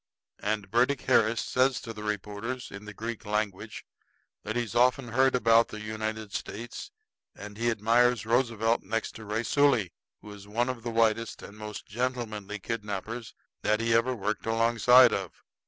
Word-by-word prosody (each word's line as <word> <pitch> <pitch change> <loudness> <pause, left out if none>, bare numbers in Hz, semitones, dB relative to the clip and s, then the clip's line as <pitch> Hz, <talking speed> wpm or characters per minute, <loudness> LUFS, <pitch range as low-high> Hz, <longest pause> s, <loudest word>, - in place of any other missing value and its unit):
And 105 -2 -2
Burdick 125 +3 +2
Harris 110 +1 +3
says 130 0 +1
to 115 - -7
the 105 - -9
reporters, 105 +4 -4
in 100 +1 -9
the 105 - -8
Greek 115 +1 -5
language, 105 0 -3 0.6
that 110 +2 -4
he's 120 -3 -2
often 125 +1 +3
heard 130 +3 +3
about 115 -1 +5
the 110 - -8
United 110 0 -4
States, 120 - -6 0.5
and 105 0 -9
he 120 +2 0
admires 115 +1 +2
Roosevelt 115 -1 +1
next 115 +3 -2
to 110 - -10
Raisuli, 115 -1 +2 0.3
who 105 - -10
is 100 -1 -12
one 120 +5 0
of 130 -2 -4
the 120 - -4
whitest 115 0 +1
and 100 - -10
most 105 0 -7
gentlemanly 110 -3 -3
kidnappers 110 +2 -5 0.3
that 105 0 +1
he 115 0 +1
ever 120 +3 +2
worked 110 0 -3
alongside 120 +2 +5
of. 95 -4 -5
115 Hz, 160 wpm, -28 LUFS, 105-120 Hz, 0.6 s, about